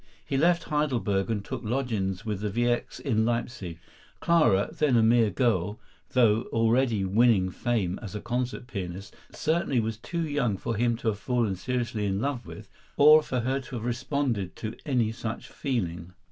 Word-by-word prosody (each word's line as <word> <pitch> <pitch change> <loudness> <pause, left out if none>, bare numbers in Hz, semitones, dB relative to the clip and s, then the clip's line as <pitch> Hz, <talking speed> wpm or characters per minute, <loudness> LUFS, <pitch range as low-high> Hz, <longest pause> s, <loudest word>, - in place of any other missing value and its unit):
He - - -3
left 170 +4 +3
Heidelberg 120 -10 0
and 105 -3 -2
took 130 -3 -5
lodgings 110 -5 -2
with 105 -3 -2
the 105 0 -2
Wiecks 120 +3 -1
in 110 -6 +1
Leipsic. 115 -7 -2 0.4
Clara, 150 - +3
then 145 -5 +2
a 115 - +4
mere 115 -1 +4
girl, 105 -5 0 0.3
though 115 -3 +4
already 115 -2 +2
winning 100 -2 +3
fame 100 -5 -1
as 105 -3 -7
a - - -2
concert 125 +2 -3
pianist, 95 -4 -6 0.2
certainly 155 -5 0
was 110 -1 -2
too 170 +7 -3
young 130 -9 0
for 115 +4 -3
him 120 +1 +1
to 115 - -1
have 105 -2 -3
fallen 120 -5 0
seriously 115 0 -2
in 95 0 -1
love 135 0 -2
with, 105 -1 -10 0.3
or 155 +2 +8
for 125 -4 -2
her 130 +3 0
to 135 -1 -9
have 115 -1 -4
responded 120 -5 -1
to 110 0 -5
any 120 -6 +1
such 115 0 -5
feeling. 90 -10 -3
115 Hz, 175 wpm, -27 LUFS, 105-130 Hz, 0.4 s, or